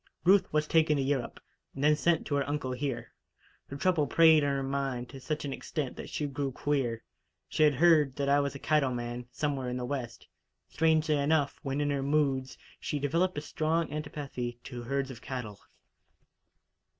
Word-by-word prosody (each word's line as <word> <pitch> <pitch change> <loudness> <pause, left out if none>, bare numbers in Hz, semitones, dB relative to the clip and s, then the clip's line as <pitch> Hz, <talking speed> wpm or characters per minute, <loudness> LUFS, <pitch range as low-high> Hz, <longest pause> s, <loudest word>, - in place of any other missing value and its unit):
Ruth 195 +2 +4
was 150 0 +2
taken 155 -1 +3
to 135 - +1
Europe, 135 -2 -2 0.4
and 135 - -4
then 150 +1 +5
sent 165 +1 +1
to 150 - -3
her 140 0 0
uncle 145 -3 -2
here. 130 -1 -4 0.5
Her 140 - -7
trouble 160 -2 +2
preyed 160 -2 +6
on 145 - +2
her 140 -1 -1
mind 135 -3 -2
to 135 - -9
such 150 +3 -3
an 140 - -3
extent 140 -3 -4
that - - -8
she 150 - -2
grew 140 -1 -2
'queer.' 125 -4 -1 0.4
She - - -2
had 150 -2 +5
heard 150 -3 +4
that 140 - -1
I 140 +1 +4
was 140 0 -1
a - - -4
cattle 140 -3 +1
man, 120 0 -5
somewhere 135 -1 -2
in 125 - -3
the 125 - -3
West. 125 -3 -5 0.4
Strangely 160 -1 +2
enough, 145 0 +1
when 140 -2 -2
in 145 0 +1
her 140 -1 0
moods, 135 -2 0 0.2
she 150 - -3
developed 165 +5 0
a - - -1
strong 160 +2 -1
antipathy 140 -5 -5
to 125 -2 -7
herds 135 +2 -2
of 115 - -10
cattle. 120 -6 -6
140 Hz, 190 wpm, -30 LUFS, 130-150 Hz, 0.5 s, preyed